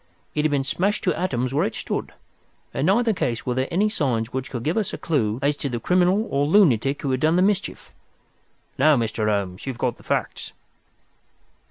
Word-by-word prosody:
It 150 - 0
had 155 - +3
been 140 -2 +1
smashed 190 +9 -1
to 180 - +2
atoms 130 -8 -1
where 150 - +2
it 115 - -2
stood. - - -4 0.6
In 135 +4 0
neither 225 +3 +3
case 120 - -2
were 125 - 0
there 130 +2 -1
any 195 +5 +2
signs 125 - -1
which 130 0 -3
could 120 -3 -5
give 155 +5 0
us 215 -3 -1
a - - -3
clue 115 -9 0
as 145 +1 +2
to 140 - -3
the 120 -2 -3
criminal 180 - +2
or 140 +1 +1
lunatic 145 - +3
who 140 - 0
had 130 - 0
done 155 +4 +2
the 180 - +4
mischief. 200 0 -1 0.9
Now, 150 +1 +5
Mr. 110 -2 -1
Holmes, 100 +1 -2
you - - 0
have - - -14
got 120 0 -1
the - - -18
facts." - - -3
140 Hz, 210 wpm, -23 LUFS, 120-180 Hz, 0.9 s, Now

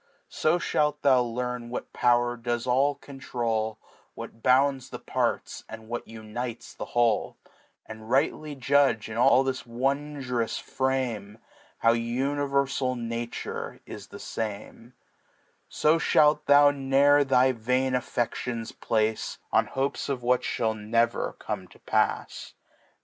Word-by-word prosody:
So 155 +3 +1
ihalt 150 -3 0
thou 130 -3 +5
icam 125 0 -4
"wtiat 120 - -4
Pow'r 120 0 +2
does 120 0 -3
all 135 +3 +2
eontrdy 115 -6 -3 0.4
What 115 - -9
bounds 135 +1 +3
the - - -6
Parts, - - -2
and 110 0 -10
what 120 0 -4
qniftes 115 +2 -7
ik^ - - -5
Wiiek^ 115 -3 +2 0.5
And 110 0 -10
rightly 145 +3 0
jndge, 135 -4 +2
in 110 - -5
all 125 +2 +5
this 130 -1 -2
wondroas 130 -1 -2
Fraiaej^ 125 -6 -2 0.4
How 115 0 +4
univeml 135 +2 0
Nature 115 0 -5
is - - -9
the - - -10
fame; 110 +3 -6 0.7
So 155 +2 +2
ihalt 150 -1 +3
thou 145 0 +7
ne'er 140 +1 +4
thy 130 -1 +4
vain 130 +2 0
AfFe^ons 120 -2 -2
place 110 -1 0
On - - +3
Hopes 135 +2 -2
of 130 -3 -2
what 125 +1 +3
ihall 110 0 -1
never 115 +2 0
come - - -5
topafs. - - -2
125 Hz, 125 wpm, -27 LUFS, 115-135 Hz, 0.7 s, thou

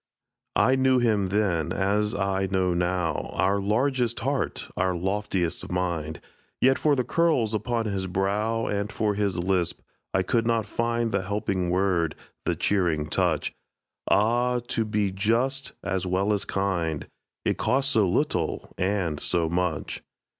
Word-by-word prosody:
I 130 - +4
knew 130 -1 +4
him 110 -5 +2
then, 90 -5 +1
as 105 +4 +1
I 95 -1 0
know 95 -1 +1
now, 90 -1 -1
Our 100 +1 +2
largest 120 +3 +1
heart, 135 +3 -1
our 95 0 +1
loftiest 95 -2 -2
mind; 85 -4 -2 0.4
Yet 130 +1 +4
for 150 -2 +3
the 130 - +1
curls 150 -9 +2
upon 115 +1 -1
his 95 -3 -2
brow 105 +5 0
And 100 0 -2
for 105 -2 0
his 100 -3 0
lisp, 90 -1 0 0.3
I 95 - +2
could 115 +5 +1
not 115 -2 +2
find 115 0 -1
The 100 - +1
helping 95 -2 -1
word, 90 -3 +1 0.3
the - - +1
cheering 85 -7 +1
touch. - - +1 0.6
Ah, 120 +5 +3
to 115 - +1
be 105 -2 0
just, 120 +8 0
as 95 -1 -1
well 95 +3 +1
as 100 - -1
kind, 85 -6 -1 0.4
It - - 0
costs 135 +1 +2
so 105 -4 +3
little 90 - -1
and 90 -5 0
so 85 -2 +1
much! 85 -3 -2
100 Hz, 145 wpm, -26 LUFS, 90-115 Hz, 0.6 s, I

